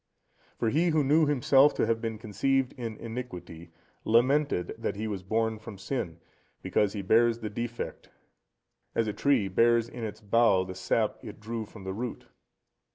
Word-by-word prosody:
For 115 - +1
he 165 +4 +2
who 155 -2 +2
knew 150 +3 +4
himself 140 0 +4
to - - +2
have 115 -1 0
been 115 -2 -3
conceived 125 +5 0
in 115 -3 -6
iniquity, 90 -8 -7 0.3
lamented 130 -2 +2
that - - -2
he 110 +2 -3
was 100 -3 -4
born 110 +3 -1
from 110 -2 -9
sin, 95 -6 -4 0.4
because 105 -2 +1
he 100 -2 -4
bears 115 +4 +4
the 110 -3 -6
defect, 120 +2 -5 0.9
as 115 - +2
a 105 - -2
tree 135 -7 +2
bears 115 +4 +3
in 120 0 -8
its 110 -2 -5
bough 105 -2 +3
the 95 0 -7
sap 95 +4 0
it 105 0 -9
drew 110 0 -5
from 100 -2 -12
the 95 0 -4
root. 120 +4 -5
115 Hz, 170 wpm, -28 LUFS, 105-125 Hz, 0.9 s, knew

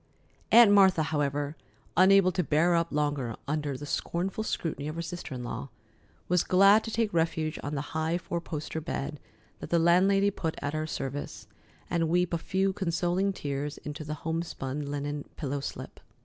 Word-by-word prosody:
Aunt 235 -3 +8
Martha, 190 -5 +6
however, 145 -1 -1 0.4
unable 190 0 +6
to 180 0 0
bear 160 +3 +3
up 170 0 +1
longer 145 -6 -1
under 145 -2 -2
the 145 - -7
scornful 185 +8 -2
scrutiny 155 -8 -3
of 155 - -4
her 170 - -3
sister 170 -4 -6
in 125 - -5
law, 130 +3 -5 0.6
was 180 -1 +3
glad 195 +4 +6
to - - -4
take 225 -2 0
refuge 160 -2 0
on 145 +1 -4
the 135 - -1
high 160 +2 0
four 170 -1 -4
poster 160 0 -5
bed 150 -2 -4 0.4
that - - -7
the 170 - +3
landlady 190 +4 +4
put 165 -4 -3
at 145 +1 -3
her 155 0 -2
service, 140 -1 -5 0.4
and 165 -2 0
weep 175 +1 +1
a 170 - +1
few 190 +3 0
consoling 180 +2 0
tears 145 -3 -4
into 150 +1 -7
the 150 0 -4
homespun 150 -4 -3
linen 145 0 -3
pillow 140 -1 -2
slip. 130 -1 -7
160 Hz, 175 wpm, -28 LUFS, 145-180 Hz, 0.6 s, Aunt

